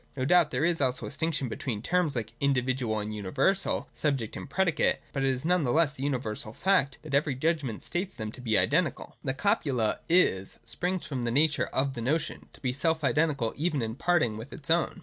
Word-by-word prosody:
No 130 - 0
doubt 175 0 +5
there 135 +4 0
is 170 -3 +1
also 130 -2 0
a - - -5
distinction 145 -1 -1
between 115 -2 -4
terms 175 -3 +1
like 115 -2 -3
individual 130 -4 +1
and 105 0 -3
universal, 105 - 0
subject 135 -8 -1
and - - -7
predicate: 185 0 +2 0.2
but 135 - -1
it 135 - +3
is 130 +2 -2
none 180 -1 +3
the 125 - +1
less 155 -1 +3
the 130 - -10
universal 120 -6 -2
fact, 180 -7 +2
that 155 -3 -8
every 140 -1 +2
judgment 140 -5 -1
states 185 +2 -3
them 110 -1 -5
to 125 - -10
be 110 -3 +2
identical. 155 0 +1
The 135 -2 -1
copula 135 - +1
'is 130 - +3
' - - -33
springs 180 +1 -2
from 135 -4 -3
the 120 - -1
nature 145 +4 +2
of 135 +1 0
the 120 - -5
notion, 150 +6 -1
to - - -17
be 125 -3 0
self 160 +3 0
identical 140 -5 +1
even 150 -4 0
in 110 0 -3
parting 135 -6 +1
with 115 +5 -8
its 145 - -8
ovwi. 170 0 +2
140 Hz, 215 wpm, -28 LUFS, 125-165 Hz, 0.2 s, doubt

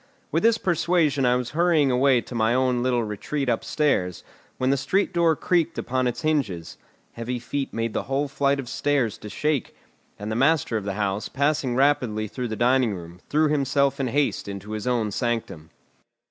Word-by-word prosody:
With - - +1
this 230 0 +4
persuasion 165 - +1
I 125 - +4
was 125 -1 -2
hurrying 160 -4 +3
away 125 0 +3
to - - -11
my 115 0 +2
own 130 -1 +1
little 125 -1 +1
retreat 110 +7 -3
upstairs, 115 - 0 0.3
when 130 +1 +1
the - - +3
street 190 +9 0
door 170 -2 +3
creaked 170 0 0
upon 130 0 0
its 120 -1 -3
hinges; 135 - -1 0.3
heavy 115 +2 -4
feet 135 +3 -4
made 115 0 -2
the - - 0
whole 140 +2 0
flight 140 0 +1
of 130 - -5
stairs 135 -5 0
to 105 - -8
shake; 150 +1 -2 0.4
and 105 +2 -5
the - - -1
master 135 -1 +2
of 105 -3 -2
the 100 -1 -3
house, 100 0 -2
passing 140 -2 0
rapidly 125 -6 +2
through 125 +4 -4
the 110 - -4
dining 120 -2 +2
room, 85 0 -10
threw 155 +1 +3
himself 140 -1 +1
in 135 - 0
haste 140 -1 0
into 100 +1 -7
his 110 +2 -4
own 115 -4 0
sanctum. 115 - -3
130 Hz, 190 wpm, -24 LUFS, 115-145 Hz, 0.4 s, this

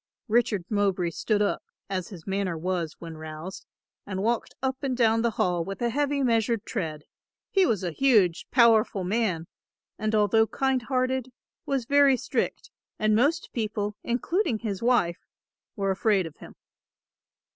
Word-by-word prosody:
Richard 220 -5 +1
Mowbray 195 -5 +1
stood 210 +5 0
up, 200 - 0 0.3
as 185 -2 -3
his 175 -6 -11
manner 195 -3 -1
was 170 -1 -2
when 165 -2 -9
roused, 155 +4 -8 0.4
and 190 -1 -4
walked 235 +1 -1
up 265 0 -1
and 260 -3 -1
down 225 -2 +3
the 235 - +2
hall 175 -2 +1
with 195 +3 -6
a 235 -1 0
heavy 285 +1 0
measured 230 -2 +1
tread; 160 -9 -4 0.5
he 385 -3 +4
was 205 -5 0
a 175 - -1
huge, 205 - +3
powerful 225 -5 +4
man, 185 -4 0 0.5
and 215 +1 0
although 215 +1 +4
kind 265 +1 0
hearted, 255 0 -1 0.4
was 270 -4 0
very 280 0 +5
strict - - -2 0.3
and 215 -1 +2
most 295 +9 +1
people, 210 -2 -2
including 255 - 0
his 210 -4 -4
wife, 230 -8 +2 0.6
were 195 -3 0
afraid 195 -1 +2
of 160 - -9
him. - - -13
215 Hz, 155 wpm, -26 LUFS, 185-245 Hz, 0.6 s, very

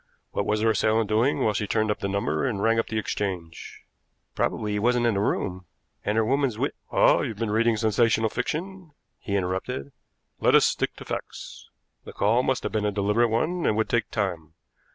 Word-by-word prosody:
What - - -2
was 105 0 +1
her 110 0 +3
assailant 110 -1 +1
doing 115 +6 +2
while 110 - +2
she 105 +1 -2
turned 110 0 +1
up 105 - -3
the 100 - -2
number 95 -6 -1
and 110 -6 -1
rang 115 +2 +2
up - - -1
the 110 - -3
exchange?" 95 -6 -4 0.5
"Probably 105 -1 -1
he 105 - 0
wasn't 120 +2 +2
in 115 - +3
the 100 - 0
room, 90 -3 -2 0.4
and 105 - -1
her 110 - +3
woman's 135 -2 +1
wit - - -1
" - - -33
"Ah, - - +5
you've 110 - -4
been 110 -1 -2
reading 115 +1 +2
sensational 110 0 +2
fiction," 170 +6 -4 0.3
he 100 - -3
interrupted. 90 -7 -2 0.5
"Let - - +4
us - - +6
stick - - -1
to - - -11
facts. - - -7 0.3
The - - -10
call 110 +5 +2
must 130 0 -1
have - - -2
been 110 -1 -1
a 105 - +1
deliberate 105 +4 +2
one 160 +10 0
and 105 - +1
would 110 - 0
take 120 - 0
time. 85 -8 -3
110 Hz, 210 wpm, -25 LUFS, 100-115 Hz, 0.5 s, us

